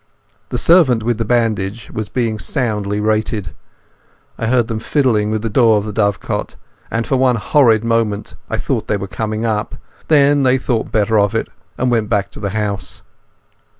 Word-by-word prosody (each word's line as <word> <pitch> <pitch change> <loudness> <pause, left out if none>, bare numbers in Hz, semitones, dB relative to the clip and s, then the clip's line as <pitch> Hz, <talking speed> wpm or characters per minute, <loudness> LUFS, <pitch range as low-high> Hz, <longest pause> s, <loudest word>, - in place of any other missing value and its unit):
The - - -2
servant 145 -10 +4
with 120 0 -1
the 115 - -1
bandage 110 -2 -1
was 110 -2 -4
being 115 -4 -1
soundly 105 -1 -2
rated. 110 - -1 0.8
I 115 - -3
heard 120 -1 +2
them 110 -1 -3
fiddling 110 -5 +1
with 110 0 -2
the - - 0
door 115 -2 +4
of 105 - -2
the 105 - -5
dovecote 100 -3 -1 0.3
and 115 0 -1
for 135 - 0
one 130 -1 +3
horrid 115 0 +3
moment 115 -3 -1 0.2
I - - -1
fancied - - -2
they 105 - 0
were 100 0 -5
coming 110 +2 -3
up. 110 -1 -2 0.3
Then 145 -2 +4
they 130 -1 +3
thought 120 -3 -2
better 110 0 +2
of 100 -1 +1
it, - - -1 0.3
and 125 0 0
went 110 -3 0
back 100 -3 0
to - - -10
the 100 -1 -2
house. 100 -1 -4
110 Hz, 185 wpm, -17 LUFS, 105-120 Hz, 0.8 s, servant